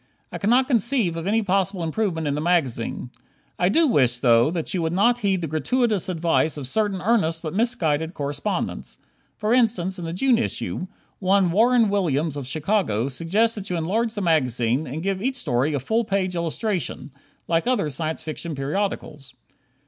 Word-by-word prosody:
I - - -5
cannot 245 +6 +3
conceive 235 - +2
of 165 +2 -4
any 220 +2 +2
possible 195 -1 0
improvement 165 -1 -1
in 145 - 0
the 150 - -2
magazine. 135 -8 0 0.5
I 180 - +3
do 330 +11 +4
wish, 130 - +2
though, 120 +1 +4
that 165 -1 -3
you 180 - 0
would 160 0 -1
not 235 +6 +3
heed 195 -4 0
the 165 - -2
gratuitous 205 - 0
advice 165 -3 +1
of 140 -3 -5
certain 200 +3 -1
earnest 180 -7 +1
but 155 -1 -4
misguided 175 -8 0
correspondents. 145 +7 -3 0.4
For 215 +2 0
instance, 205 -7 +1
in 170 - -5
the 165 - -4
June 240 +5 +2
issue, 185 -5 -2 0.3
one 190 -2 +3
Warren 230 +4 +4
Williams 160 -6 0
of 140 -3 -5
Chicago, 150 - 0
suggests 190 - +1
that 205 -3 -6
you 180 - -1
enlarge 220 +8 -1
the 205 - -3
magazine 130 -5 +1
and 150 +6 -5
give 195 -1 -1
each 260 +4 -1
story 140 - 0
a - - 0
full 220 - 0
page 195 -3 -1
illustration, 170 - -3 0.4
like 165 +5 +1
other 210 -12 +1
Science 155 +3 -3
Fiction 160 0 -5
periodicals. 140 -3 -4
175 Hz, 175 wpm, -23 LUFS, 150-210 Hz, 0.5 s, do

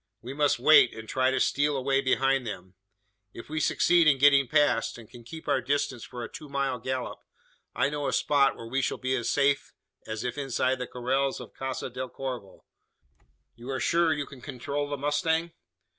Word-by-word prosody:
We 125 +3 -6
must 145 0 +2
wait, 125 -1 +6
and 110 0 -9
try 130 +2 +1
to 130 0 0
steal 145 +2 +1
away 135 +1 +1
behind 135 -1 +1
them. 95 -3 -7 0.6
If 115 - -10
we 155 0 -2
succeed 170 +2 +3
in 140 -3 +5
getting 140 -1 +5
past, 145 -6 +2
and 115 -2 -12
can 120 +1 -14
keep 160 +7 -10
our 130 - +2
distance 140 -1 -1
for 120 -1 -7
a - - -4
two 150 - -10
mile 140 -2 -1
gallop, 130 +1 -4 0.6
I 140 - +2
know 145 -1 -2
a - - 0
spot, 140 -2 +2
where 115 - -9
we 135 +4 -1
shall - - -1
be 130 0 -1
as 120 -3 -2
safe 140 0 +1 0.3
as 110 0 -4
if 125 +2 -3
inside 130 -1 0
the 125 - -4
corrals 135 +2 -1
of - - -10
Casa 135 -1 -4
del 130 +1 -5
Corvo. 125 -9 -7 0.9
You 120 +3 -10
are 130 -1 -2
sure 170 -1 +2
you 145 0 -1
can 140 -3 -13
control 145 +2 -4
the 145 - -3
mustang?" 160 +4 0
135 Hz, 200 wpm, -27 LUFS, 125-145 Hz, 0.9 s, wait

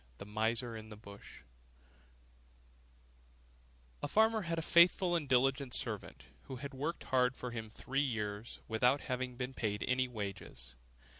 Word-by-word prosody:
THE - - -8
MISER 115 +3 0
IN 110 0 -8
THE 105 - -9
BUSH 100 -2 -12 2.6
A - - -1
farmer 220 0 +4
had 170 -3 -2
a 165 - -1
faithful 175 +2 +5
and 150 -5 -1
diligent 135 0 +3
servant, - - -3 0.2
who 130 - -6
had 140 +3 -6
worked 145 +6 -3
hard 125 -1 +2
for 125 - -5
him 110 -2 -5
three 135 +5 -1
years, 110 -4 -3
without 125 +5 +3
having 125 -1 -3
been 125 +1 -4
paid 105 -4 -1
any 130 0 +2
wages. 100 - -6
125 Hz, 145 wpm, -35 LUFS, 110-140 Hz, 2.6 s, faithful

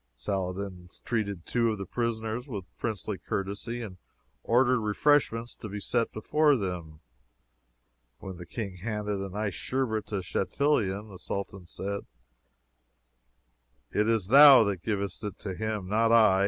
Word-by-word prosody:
Saladin 90 +5 -4 0.2
treated 100 -7 -2
two 115 -1 +1
of 110 - -3
the 100 - -5
prisoners 115 +2 -2
with 100 -8 -5
princely 105 -3 -3
courtesy, 100 +5 -3
and 95 -4 -9 0.4
ordered 125 - +3
refreshments 115 +1 +2
to 110 - -8
be 105 +1 -5
set 115 +3 0
before 150 +7 +3
them. 90 - -4 1.2
When 95 -2 -8
the 85 -1 -10
King 100 -1 -5
handed 105 0 -3
an 95 0 -5
iced 105 -2 -2
Sherbet 120 -5 -1
to 100 -3 -3
Chatillon, 100 - 0
the 95 -3 -11
Sultan 95 -2 -5
said, 100 +4 -5 1.8
"It 105 +1 +2
is 110 -4 +1
thou 140 -1 +10
that 100 -4 -2
givest 100 -1 -3
it 105 -3 -5
to 95 - -5
him, 105 -1 -3
not 115 +3 +2
I." 110 -5 +6
105 Hz, 140 wpm, -28 LUFS, 95-115 Hz, 1.8 s, thou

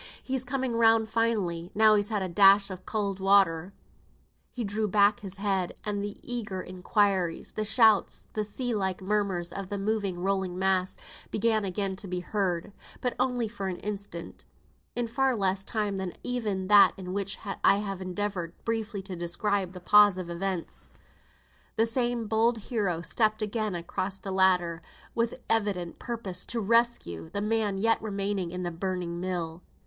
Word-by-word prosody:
"He's 260 -1 -1
coming 260 -1 -2
round 225 -1 +4
finely, 205 -8 0
now 215 0 +6
he's 205 0 +2
had 210 -3 -1
a - - -2
dash 195 +2 +6
of 185 -1 -9
cowd 200 -3 -1
water." 190 -3 +3 0.8
He 245 - -4
drew 210 +1 -1
back 205 +1 +4
his 195 -2 -7
head; 195 -3 -1
and 205 -1 -2
the 205 0 -5
eager 215 -6 -3
inquiries, 185 -1 0
the 215 - -2
shouts, 220 -1 +3
the 215 - -1
sea 245 +3 -3
like 190 -3 -1
murmurs 190 -3 -1
of 195 -1 -5
the 205 - -2
moving 200 -2 -1
rolling 190 0 -1
mass 190 -1 +1 0.3
began 220 0 +1
again 195 0 -1
to 200 - -7
be 180 0 -2
heard 190 -1 -2 0.3
but 250 - -1 0.4
for 200 -4 -4
an 185 - -2
instant 200 -5 -6 0.5
though. 245 - +1
In - - 0
far 260 +2 +1
less 195 -2 0
time 205 -2 -2
than 190 -2 -4
even 215 -7 -2
that 205 0 +7
in 185 -1 -6
which 200 0 -2 0.3
I - - +6
have 200 -2 -4
endeavoured 185 -2 -3
briefly 220 -3 -2
to 190 -1 -6
describe 185 +2 -1
the 180 - -8
pause 205 +1 +6
of 175 -2 -5
events, 180 0 -4 0.9
the 225 - +3
same 240 0 0
bold 225 +2 +2
hero 200 -7 -2
stepped 215 +2 +1
again 215 -2 -2
upon 175 +3 -3
the 195 - -4
ladder, 180 -3 +2 0.3
with 235 +2 -1
evident 200 -6 0
purpose 205 -7 -3
to 235 - -3
rescue 225 - +1
the 200 +4 -3
man 210 -1 0
yet 225 +3 +2
remaining 200 -3 -2
in 180 +1 -4
the 175 - -2
burning 175 0 -3
mill. 175 -2 -3
200 Hz, 165 wpm, -28 LUFS, 185-220 Hz, 0.9 s, that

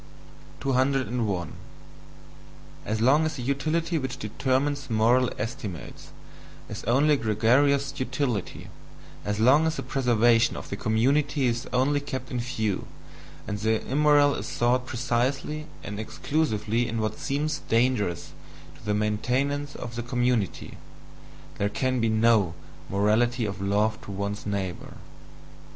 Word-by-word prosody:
201. 125 - 0 1.3
As 110 +1 -1
long 140 +6 +5
as 155 -1 -1
the 125 - -5
utility 160 +5 0
which 130 -1 -4
determines 135 +5 -1
moral 120 +3 +3
estimates 110 - -6 0.6
is - - -7
only 140 +7 +4
gregarious 140 +5 +2
utility, 130 -5 -2 0.5
as 105 0 -2
long 140 +8 +5
as 160 - -1
the - - -4
preservation 120 -3 +3
of - - -8
the - - -1
community 135 +7 +1
is 120 0 -1
only 135 +3 +2
kept 130 -3 -6
in 125 - -2
view, 110 -5 -2 0.6
and 100 0 -3
the 110 +1 0
immoral 145 +1 +4
is - - -4
sought 125 +1 +1
precisely 135 +5 -1 0.2
and 105 0 -5
exclusively 115 -2 -1
in 115 -1 -2
what 110 -1 -2
seems 150 +2 -1
dangerous 115 -7 +1 0.4
to - - -18
the 105 -1 0
maintenance 130 +7 -1
of 120 -1 -7
the 120 - -2
community, 120 -4 -1 0.8
there 100 - +1
can 130 +3 0
be 115 -1 +2
no 110 -5 +3 0.3
"morality 110 +4 +2
of 100 -2 -5
love 105 +2 +1
to - - -11
one's 100 +1 -4
neighbour." 95 -4 -4
120 Hz, 130 wpm, -26 LUFS, 110-140 Hz, 1.3 s, long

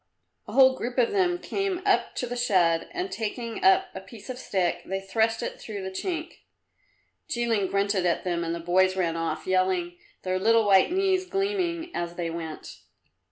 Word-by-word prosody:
A - - -8
whole 260 -1 +6
group 245 0 -5
of 245 -2 +3
them 365 -3 +2
came 390 0 -2
up - - +2
to - - -2
the 245 0 -5
shed, 180 -9 +2
and 365 +2 -4
taking 230 +1 -4
up 380 0 +5
a 190 - -7
piece 225 +5 -10
of 250 - -8
stick, 185 -8 -1
they 195 +1 -3
thrust 220 +4 0
it - - -5
through 205 -3 -6
the 190 - -4
chink. 325 - -4 0.9
Jilin 230 -7 0
grunted 200 -1 +1
at 170 - 0
them 175 -2 -1
and 165 0 -2
the - - -5
boys 185 +2 +2
ran 170 -3 0
off, 165 0 -3
yelling, 185 -2 0 0.2
their 185 0 -1
little 225 +2 +4
white 195 - +5
knees 375 0 +1
gleaming 365 -4 -2
as 175 0 -3
they 170 -2 -3
went. 165 -2 -7
210 Hz, 185 wpm, -26 LUFS, -, 0.9 s, whole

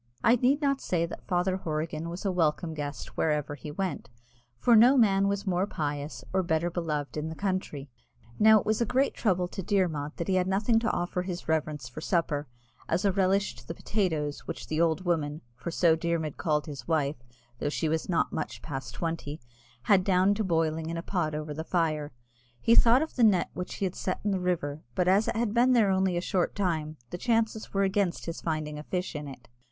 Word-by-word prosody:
I 235 - +6
need 265 +5 +2
not 275 -1 +1
say 170 -2 0
that 170 - -9
Father 185 +1 +1
Horrigan 155 -1 -3
was 175 +4 -6
a 195 - +2
welcome 165 -1 0
guest 145 -1 -6
wherever 150 -2 0
he 145 +1 -8
went, 185 +1 -3 0.5
for 235 - +4
no 245 +5 +7
man 200 -4 +4
was 200 +1 -1
more 185 0 +1
pious 145 -3 -4
or 190 - +3
better 170 0 0
beloved 155 -4 -3
in 155 +1 -2
the 160 - -6
country. 185 -8 -3 0.5
Now 220 0 +7
it - - -6
was 215 +2 +1
a - - +3
great 265 +4 +2
trouble 180 -5 +1
to 195 - -5
Dermod 165 -6 0
that 170 - -3
he 190 - +1
had 185 0 +2
nothing 210 +4 +2
to 225 -1 0
offer 175 +1 -1
his 180 -1 -5
reverence 150 -4 -1
for 125 +5 -8
supper 155 -4 0 0.4
as 175 +5 +1
a 200 - +4
relish 195 -3 +1
to 120 0 -14
the 165 - -5
potatoes, 160 -10 -2
which - - -5
"the 155 +1 -1
old 170 +2 +1
woman," 155 -3 -1
for 150 - -6
so 170 -1 +3
Dermod 165 -2 -2
called 150 -2 0
his 145 -3 -8
wife, 155 -3 +1 0.4
though 145 - -1
she 160 +2 -1
was 160 +3 -1
not 170 - +1
much 155 - -4
past 135 -5 -6
twenty, 165 -3 -3 0.4
had 195 -3 +4
down 190 +1 +3
boiling 165 -6 0
in 165 - -3
a 165 - -4
pot 165 -6 -1
over 150 0 -4
the 160 +2 -4
fire; 155 -4 0 0.5
he 230 - +3
thought 240 +4 +6
of 320 - -7
the 245 - +4
net 205 -5 +4
which 180 - -5
he 200 - -1
had 180 - -2
set 185 - -3
in 205 - +1
the 190 - 0
river, 155 -5 -1
but 180 - +1
as 195 +4 +4
it - - -1
had 225 -2 0
been 245 +2 +4
there 220 -5 +4
only 190 -2 +1
a - - 0
short 180 -1 0
time, 160 -6 -1
the 175 - -5
chances 225 -1 0
were 195 0 +1
against 195 -2 0
his 165 0 -5
finding 155 -2 -3
a - - -7
fish 180 +1 -3
in 150 0 -5
it. 130 -3 -11
175 Hz, 220 wpm, -28 LUFS, 155-195 Hz, 0.5 s, no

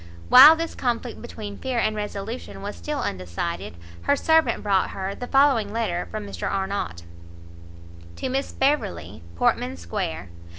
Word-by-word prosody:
While 280 +6 +10
this 330 0 -4
conflict 240 -1 -3
between 210 -4 -8
fear 260 -2 -3
and 215 -2 +1
resolution 210 +1 -6
was 205 +1 -5
still 300 -1 -4
undecided, 90 - -4 0.3
her 285 - +2
servant 320 +2 +2
brought 195 -3 +2
her 190 0 -4
the 245 - -7
following 270 -7 +3
letter 215 -6 -2
from 215 -1 -5
Mr 200 - -4
Arnott. 190 - -3 1.1
To - - -4
Miss 270 +2 -2
Beverley, 100 - -1
Portman 85 0 0
square. 85 0 -4
210 Hz, 140 wpm, -24 LUFS, 175-260 Hz, 1.1 s, While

